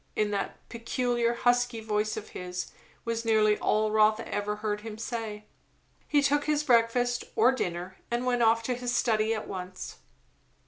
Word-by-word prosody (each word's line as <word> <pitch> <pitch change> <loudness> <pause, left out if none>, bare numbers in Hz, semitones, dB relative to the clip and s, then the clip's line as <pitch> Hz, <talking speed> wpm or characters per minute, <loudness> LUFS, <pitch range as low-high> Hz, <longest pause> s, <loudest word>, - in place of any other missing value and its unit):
in 210 -1 +1
that 200 -1 -2
peculiar 235 0 -1
husky 245 0 +2
voice 215 0 -1
of 215 - -6
his, 180 0 -5 0.3
was 230 0 -2
nearly 215 -2 +4
all 215 0 +1
Rotha 215 +1 +3
ever 205 0 -2
heard 210 0 -3
him 215 -1 -7
say. 220 -2 -5 0.6
He 290 -1 +3
took 290 +1 +2
his 300 -1 +1
breakfast, 245 -1 +2
or 235 +3 +5
his 260 - -5
dinner, 180 +2 -3
and 240 +1 -1
went 245 -1 +1
off 230 0 +4
to 250 - -1
his 245 0 -3
study 220 -2 +2
at 215 - -5
once. 185 -1 -7
225 Hz, 170 wpm, -28 LUFS, 210-245 Hz, 0.6 s, or